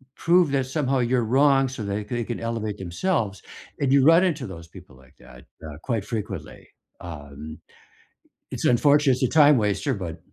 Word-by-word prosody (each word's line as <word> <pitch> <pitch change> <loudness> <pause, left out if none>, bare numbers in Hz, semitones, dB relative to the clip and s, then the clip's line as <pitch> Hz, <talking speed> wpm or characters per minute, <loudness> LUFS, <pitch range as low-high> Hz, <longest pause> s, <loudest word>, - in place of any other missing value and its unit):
prove 175 -1 +3
that 135 -2 0
somehow 135 -1 -1
you're 120 -1 +1
wrong, 135 +3 +3
so, 130 -3 -7
they 100 +1 -3
they 120 +2 -3
can 120 +1 -5
elevate 115 -3 -4
themselves. 100 - -2 0.4
And 135 -2 +1
you 135 -1 +4
run 165 +3 +6
into 155 -9 -1
those 85 -3 -10
people - - -15
like 65 -1 -21
that, 60 0 -15 0.2
uh, 75 -2 -8
quite 115 -6 -2
frequently. 105 - -7 0.3
Um. 75 -2 -9 0.9
It's - - -4
unfortunate, 140 +3 +4
it's 125 - -3
a - - +3
time 150 -3 +5
waster, 105 +5 0
but 90 -6 -6
120 Hz, 175 wpm, -24 LUFS, 95-140 Hz, 0.9 s, run